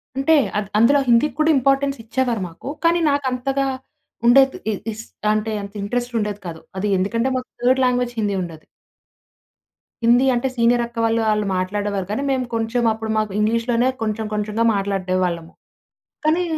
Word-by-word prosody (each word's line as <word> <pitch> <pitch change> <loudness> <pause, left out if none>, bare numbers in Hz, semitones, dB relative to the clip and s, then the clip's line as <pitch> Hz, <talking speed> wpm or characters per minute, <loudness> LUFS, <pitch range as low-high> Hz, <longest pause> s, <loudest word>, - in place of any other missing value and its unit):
అంటే, 275 +4 +3 0.2
అద్ 205 -2 -2
అందులో 265 +6 +5
హిందీకి 240 +6 +3
కూడా 310 +1 +3
ఇంపార్టెన్స్ 275 +1 +1
ఇచ్చేవారు 235 -2 -1
మాకు. 170 +10 -9 0.2
కానీ, 340 +1 +4
నాకంతగా 270 0 -1 0.6
ఉండేది 265 +2 +5
ఇ - - -1 0.2
ఇస్ 220 +1 -8 0.3
అంటే 215 +1 0
అంత 200 +1 -9
ఇంట్రెస్ట్ 245 +4 -2
ఉండేది 210 -1 -3
కాదు. 160 -1 -7 0.2
అది 205 +2 -1
ఎందుకంటే, 230 +7 0
మాకు 255 - -6
థర్డ్ 260 +2 +3
లాంగ్వేజ్ 245 -1 0
హిందీ 205 -2 0
ఉండేది. 160 -2 -9 1.4
హిందీ 240 +3 +5
అంటే 245 +2 0
సీనియర్ 235 0 +3
అక్క 235 0 -14
వాళ్ళు, 225 0 +1
వాళ్ళు 210 -1 +1
మాట్లాడేవారు. 200 +1 -2
కానీ, 275 +7 -2
మేము 255 -1 0
కొంచెం 225 +2 0
అప్పుడు 220 0 -4
మాకు 215 -2 0
ఇంగ్లీష్‌లోనే 230 +3 +1
కొంచెం 220 0 -2
కొంచెంగా 210 +2 -1
మాట్లాడేవాళ్ళము. 185 -4 -1 0.7
కానీ, 330 +4 +3
230 Hz, 150 wpm, -21 LUFS, 210-255 Hz, 1.4 s, అందులో